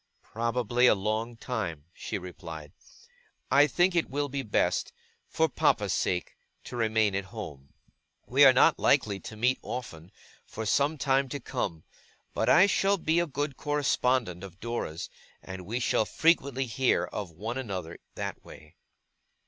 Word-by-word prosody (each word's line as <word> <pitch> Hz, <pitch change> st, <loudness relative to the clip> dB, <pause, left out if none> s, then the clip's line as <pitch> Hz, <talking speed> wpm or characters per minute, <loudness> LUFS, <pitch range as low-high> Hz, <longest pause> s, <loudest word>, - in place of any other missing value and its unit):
'Probably 120 Hz, +1 st, +1 dB
a -, -, +6 dB
long 110 Hz, +4 st, -2 dB
time,' 90 Hz, -13 st, -4 dB
she -, -, -5 dB
replied; 80 Hz, -5 st, -9 dB, 0.8 s
'I 145 Hz, +2 st, +6 dB
think 175 Hz, +6 st, +2 dB
it 170 Hz, -, +1 dB
will 145 Hz, +2 st, -2 dB
be 140 Hz, +1 st, -2 dB
best 110 Hz, -5 st, 0 dB, 0.4 s
for 160 Hz, -, +2 dB
papa's 105 Hz, -, +1 dB
sake 90 Hz, -1 st, -1 dB, 0.3 s
to -, -, -8 dB
remain 110 Hz, -3 st, +2 dB
at 100 Hz, 0 st, -2 dB
home. 80 Hz, -, -9 dB, 0.5 s
We 135 Hz, +4 st, +4 dB
are 135 Hz, -, +10 dB
not 130 Hz, -, +4 dB
likely 105 Hz, -8 st, +2 dB
to 110 Hz, -, -9 dB
meet 125 Hz, +4 st, +2 dB
often, 90 Hz, -10 st, -7 dB, 0.3 s
for 110 Hz, -, -7 dB
some 140 Hz, +8 st, +2 dB
time 135 Hz, -1 st, +1 dB
to 145 Hz, -, -4 dB
come; 85 Hz, -9 st, -4 dB, 0.5 s
but -, -, 0 dB
I 175 Hz, +3 st, +7 dB
shall 200 Hz, 0 st, +2 dB
be 165 Hz, -1 st, +1 dB
a 175 Hz, -, 0 dB
good 145 Hz, -1 st, -3 dB
correspondent 130 Hz, -, 0 dB
of 95 Hz, -1 st, -10 dB
Dora's, 115 Hz, -9 st, -4 dB, 0.4 s
and 95 Hz, -1 st, -8 dB
we 115 Hz, +4 st, -2 dB
shall 115 Hz, -2 st, +1 dB
frequently 140 Hz, -2 st, +2 dB
hear 130 Hz, +2 st, +1 dB
of 100 Hz, -4 st, -5 dB
one 110 Hz, +10 st, -5 dB
another 95 Hz, -9 st, -5 dB, 0.2 s
that -, -, -5 dB
way. 75 Hz, +2 st, -15 dB
115 Hz, 155 wpm, -28 LUFS, 95-135 Hz, 0.8 s, are